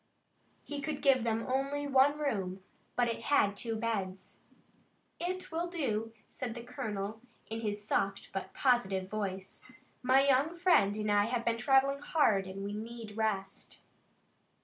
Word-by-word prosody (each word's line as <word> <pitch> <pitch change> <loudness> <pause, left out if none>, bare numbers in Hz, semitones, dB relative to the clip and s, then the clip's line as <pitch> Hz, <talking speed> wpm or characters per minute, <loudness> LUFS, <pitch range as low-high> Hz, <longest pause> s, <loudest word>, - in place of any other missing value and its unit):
He 290 -1 -5
could 295 0 -4
give 265 -4 +5
them 225 -1 0
only 275 +2 -1
one 280 +1 +4
room, 195 -10 -2 0.3
but 245 -1 +3
it 230 - -3
had 205 -8 +3
two 225 +2 -2
beds. 200 -4 -3 0.8
"It 365 +1 -3
will 335 +2 -1
do," 230 - -2 0.2
said 240 -3 -5
the 235 - -7
colonel, 215 -3 -4 0.2
in 225 +1 -5
his 210 -1 -3
soft 195 -2 -1
but 195 - -4
positive 195 -8 +2
voice. 195 -3 -4 0.4
"My 260 +2 +5
young 280 +6 +3
friend 340 - +4
and 210 -1 0
I 205 0 +4
have 235 +1 -2
been 230 0 +1
traveling 270 +2 +3
hard 215 -11 +2
and 195 +1 -6
we 200 +1 -4
need 220 0 -7
rest." 215 -3 -3
230 Hz, 150 wpm, -32 LUFS, 205-275 Hz, 0.8 s, give